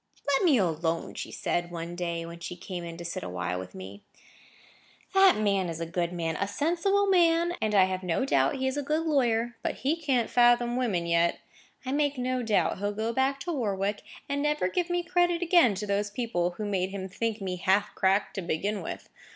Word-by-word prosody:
"Let 285 +5 +2
me 300 -7 +5
alone," 165 -3 -1
said 175 - -2
she, - - -15
one 170 0 -5
day 170 -1 -3
when 170 0 -9
she 180 - -6
came 175 0 -6
in 170 -1 -7
to 170 - -8
sit 170 - -4
awhile 90 0 -3
with 90 0 -9
me. 95 +2 -9 1.1
"That 385 - +6
man 200 -4 +1
is 165 -1 -5
a 165 - -2
good 170 +1 -2
man—a 170 +2 -2
sensible 345 - +1
man—and 340 - +2
I 195 - +7
have 185 0 -1
no 180 +7 0
doubt 275 - +2
he 265 -1 -2
is 265 +2 -1
a - - 0
good 305 +3 -1
lawyer; 240 -6 +1
but - - -2
he 285 +4 0
can't 270 -8 0
fathom 240 0 +4
women 215 -9 0
yet. 170 0 +2 0.5
I 260 - -2
make 290 0 +1
no 255 0 -1
doubt 220 -4 +1
he'll 205 +1 -1
go 220 +2 -2
back 270 +2 +1
to 345 +3 -3
Warwick, 205 -6 -1 0.3
and 280 0 -1
never 295 -9 +1
give 355 - -1 0.2
credit 350 -1 +2
again 335 - +5
to 205 +3 -4
those 205 0 0
people 200 -6 -2
who 215 - -3
made 190 -2 -1
him 190 -1 -5
think 225 +3 -3
me 185 -2 -3
half 190 +3 +1
cracked 195 +1 +1
to 195 - -3
begin 190 +5 -2
with. - - -6
205 Hz, 205 wpm, -28 LUFS, 175-275 Hz, 1.1 s, I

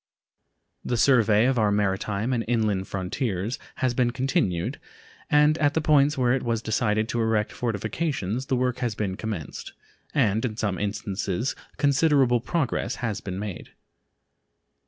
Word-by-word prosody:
The 120 - -1
survey 115 -4 +4
of 130 -2 +2
our 105 -1 +3
maritime 105 +3 0
and 115 -2 0
inland 110 -5 0
frontiers 100 +3 -2 0.2
has 130 -2 0
been 120 -1 +2
continued, 120 - -1 0.5
and 150 +2 +4
at 145 0 +2
the - - +3
points 150 -1 +3
where 125 -1 +3
it 135 - 0
was 115 -1 -1
decided 110 -1 +1
to 120 - 0
erect 110 -1 +1
fortifications 120 - -2
the 130 - +1
work 125 0 0
has 120 -4 -1
been 100 -3 -2
commenced, 100 -8 -6 0.4
and 110 -6 +2
in 110 -4 -2
some 100 -6 -1
instances 105 +2 -2 0.2
considerable 140 -3 +3
progress 140 +2 -1
has 105 -4 -2
been 95 -1 -5
made. 100 -2 -6
115 Hz, 145 wpm, -25 LUFS, 105-130 Hz, 0.5 s, survey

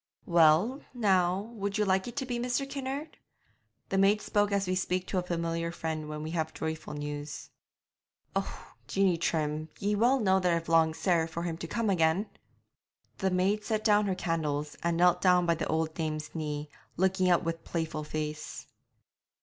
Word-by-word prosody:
'Well, 175 - +4
now, 195 -1 +2
would 200 -2 -2
you 210 - +2
like 190 +1 +1
it 240 - -7
to 270 - -2
be 245 -1 -3
Mr. 250 +3 -1
Kinnaird?' 275 +2 -5 0.7
The 195 - +1
maid 200 +2 +4
spoke 205 0 +1
as 200 -1 +1
we 185 - -1
speak 185 0 -1
to 185 - -1
a - - 0
familiar 170 -1 -2
friend 160 -2 -4
when 150 0 -5
we 155 - -4
have 160 -2 -2
joyful 160 -1 -4
news. 145 0 -6 0.8
'Oh, - - -4
Jeanie 190 -4 +2
Trim, 155 -1 -1
ye 205 +1 0
know 240 +6 +4
well 190 -5 +3
that 180 -1 +2
I've 165 0 -3
longed 160 -1 +4
sair 170 -3 +2
for 165 +1 -5
him 170 -2 -2
to 165 - -6
come 225 +2 0
again!' 175 +3 +2 0.9
The 190 - +1
maid 190 +3 +1
set 215 0 -1
down 210 -1 +4
her 190 - 0
candles, 150 -4 -2
and 170 0 0
knelt 180 0 +4
down 180 -1 +4
by 170 - +3
the 165 - -3
old 160 0 0
dame's 155 -2 -3
knee, 150 -2 -3 0.3
looking 185 +1 +2
up 175 0 +4
with 165 0 -3
playful 160 -2 -3
face. 150 0 -5
175 Hz, 180 wpm, -30 LUFS, 160-200 Hz, 0.9 s, Well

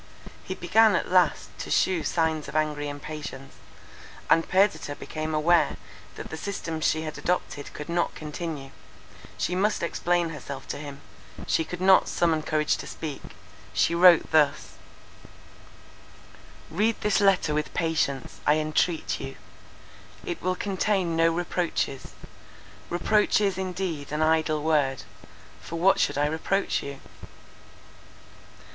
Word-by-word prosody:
He 185 - -5
began 215 +5 +4
at - - -2
last 180 -3 +2
to - - -6
shew 185 -3 +2
signs 160 -2 0
of - - -9
angry 150 -1 0
impatience, 145 -2 -7 0.8
and 165 - +4
Perdita 190 -6 +2
became 155 +1 -4
aware 170 +3 +3 0.4
that - - -8
the 160 - -5
system 165 -3 -4
she 160 0 +1
had 155 -1 -6
adopted 175 -5 -2
could 150 - -7
not 170 0 -1
continue; 150 -3 -6 0.7
she - - -1
must 200 +2 +1
explain 175 0 0
herself 140 -3 -8
to - - -4
him; 145 -1 -8 0.4
she 160 - +1
could 180 +2 -7
not 190 0 +6
summon 165 -2 +1
courage 155 0 0
to - - -8
speak—she 155 +2 -4
wrote 175 -1 +6
thus:— 150 -3 +2 2.0
"Read 210 +7 +1
this 210 0 +2
letter 195 -6 +3
with 150 0 -1
patience, 150 -5 -1
I 150 - +6
entreat 155 +2 0
you. 135 0 -6 0.9
It 175 - -4
will 185 0 0
contain 190 -3 0
no 165 0 +4
reproaches. 170 -5 -2 0.8
Reproach 210 +6 +2
is 200 -2 +1
indeed 180 -6 -4
an 150 +1 0
idle 155 -1 +2
word: 145 -4 +1 0.6
for 170 - -7
what 185 +4 +3
should - - +1
I 145 - +2
reproach 160 +6 0
you? 140 -1 -7
160 Hz, 130 wpm, -26 LUFS, 150-180 Hz, 2.0 s, not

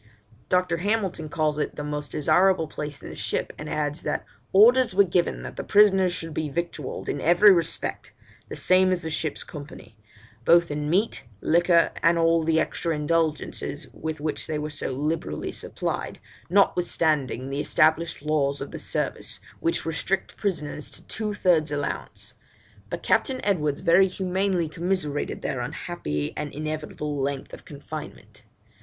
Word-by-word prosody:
Dr. 180 -2 +2
Hamilton 190 -4 -1
calls 155 -1 0
it - - -2
the 150 - -5
most 150 0 -3
desirable 180 +3 +3
place 150 -1 -6
in - - -7
the - - -8
ship, - - -2
and 150 - -6
adds, 150 0 -2
that - - -2 0.3
'orders 230 +2 +6
were 200 - +7
given 175 -2 0
that - - -8
the - - -3
prisoners 195 -3 +5
should 165 -2 -4
be 155 0 -2
victualled, 155 -2 -4
in 145 - -2
every 175 +5 +7
respect, 170 -3 0 0.4
the - - -5
same 185 0 +4
as 180 -2 0
the 160 - -3
ship's 155 -1 -2
company, 145 -7 -10 0.5
both 170 +3 +5
in 150 0 -2
meat, 195 - +1
liquor, 170 - +4
and 170 0 +4
all 165 0 +3
the 160 0 +3
extra 165 +1 -1
indulgences 155 0 -1
with 160 -1 -5
which 155 0 -3
they 155 -2 -2
were 150 0 -4
so 145 - -3
liberally 145 - -2
supplied, - - -4 0.3
notwithstanding 155 -8 +2
the 140 +1 -1
established 155 0 +2
laws 145 -2 +1
of 140 - -6
the - - -6
service, - - -3 0.2
which 165 - 0
restrict 165 +4 -1
prisoners 150 -7 -2
to - - -11
two 215 -2 -3
thirds 165 -6 +2
allowance; 145 -1 -3 0.6
but - - -5
Captain 260 -2 +2
Edwards 150 -8 +1
very 185 +3 +5
humanely 185 -1 0
commiserated 165 -2 -2
their - - -2
unhappy 75 0 -3
and 150 -1 -4
inevitable 150 0 -4
length 140 0 -3
of - - -10
confinement.' 150 +1 -9
160 Hz, 155 wpm, -25 LUFS, 150-180 Hz, 0.6 s, were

